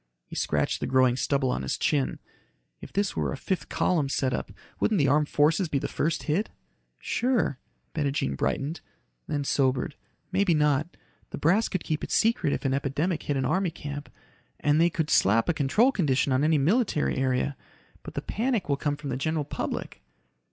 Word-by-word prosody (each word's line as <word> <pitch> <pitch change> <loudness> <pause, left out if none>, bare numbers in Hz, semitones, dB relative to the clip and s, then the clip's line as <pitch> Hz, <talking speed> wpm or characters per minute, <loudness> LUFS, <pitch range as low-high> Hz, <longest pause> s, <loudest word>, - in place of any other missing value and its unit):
He - - -10
scratched - - 0
the - - -2
growing 130 -1 +4
stubble 135 0 +1
on - - -2
his 65 - -2
chin. 65 -3 0 0.6
"If - - -10
this 200 0 0
were - - -1
a - - -4
fifth 190 - -3
column 155 -6 +1
setup, 130 -2 -1 0.3
wouldn't 215 - +2
the 145 -4 +3
armed 150 +2 +3
forces 155 +4 +2
be 145 - 0
the - - -2
first 160 +1 -1
hit?" 175 +8 0 0.5
"Sure," 240 - 0 0.3
Bettijean 140 - -1
brightened, 145 - -2 0.5
then 145 -1 -1
sobered. 135 0 +1 0.4
"Maybe 190 -2 +3
not. 150 +2 +1 0.3
The - - -6
brass 195 +9 +3
could 185 - -2
keep 155 -2 -2
it - - -4
secret 220 -9 +2
if - - -3
an 135 - +2
epidemic 145 +5 -1
hit 145 - -1
an 135 - 0
army 185 0 +1
camp. 145 -2 -7 0.5
And 150 +2 +3
they 170 - +5
could 160 -2 -2
slap 110 +4 +4
a 175 - +2
control 160 - +3
condition 140 - +1
on 130 +2 +2
any 155 0 +4
military 170 - +1
area. 130 +1 0 0.5
But - - -10
the - - -3
panic 235 -2 -1
will 140 -1 +1
come 145 0 -1
from 145 -2 -5
the 125 - -1
general 155 +1 -1
public." - - -4
150 Hz, 185 wpm, -27 LUFS, 135-175 Hz, 0.6 s, they